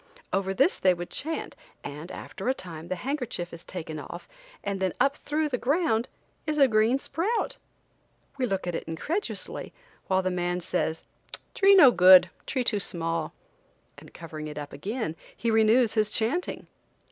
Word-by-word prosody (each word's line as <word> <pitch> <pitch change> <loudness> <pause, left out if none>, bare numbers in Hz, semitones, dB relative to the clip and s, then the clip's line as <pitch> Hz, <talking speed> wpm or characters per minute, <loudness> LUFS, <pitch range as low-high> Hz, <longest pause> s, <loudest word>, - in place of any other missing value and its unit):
Over 195 0 +1
this 270 - +2
they 185 -1 +4
would 175 0 -7
chant, 320 +2 -3 0.3
and 150 +4 -7
after 195 - -5
a 265 - +2
time 170 -5 -8
the 185 - -2
handkerchief 250 -7 -3
is 170 +1 -9
taken 160 -4 -6
off 175 +4 -8 0.4
and 200 -1 -2
then 190 -1 0
up 275 +3 +3
through 305 +1 -1
the 250 -3 -2
ground 265 -4 +1 0.4
is 305 0 0
a 275 -2 +7
green 220 +2 +3
sprout. 375 +11 -1 0.8
We 255 - +1
look 195 -4 -2
at 175 - -2
it - - -3
incredulously, 305 - -3 0.3
while 190 -1 +2
the 185 - 0
man 175 0 -1
says: 165 -2 -2 0.5
"Tree 395 0 +6
no 290 -10 +9
good; 185 -3 +8 0.2
tree 260 -2 0
too 215 -3 +2
small," 165 -4 -3 0.6
and - - -14
covering 155 -2 -7
it 150 0 -7
up 145 -1 -6
again 195 - -3 0.2
he 230 - 0
renews 220 +1 +4
his 215 -2 +2
chanting. 265 +14 -1
200 Hz, 170 wpm, -27 LUFS, 175-260 Hz, 0.8 s, no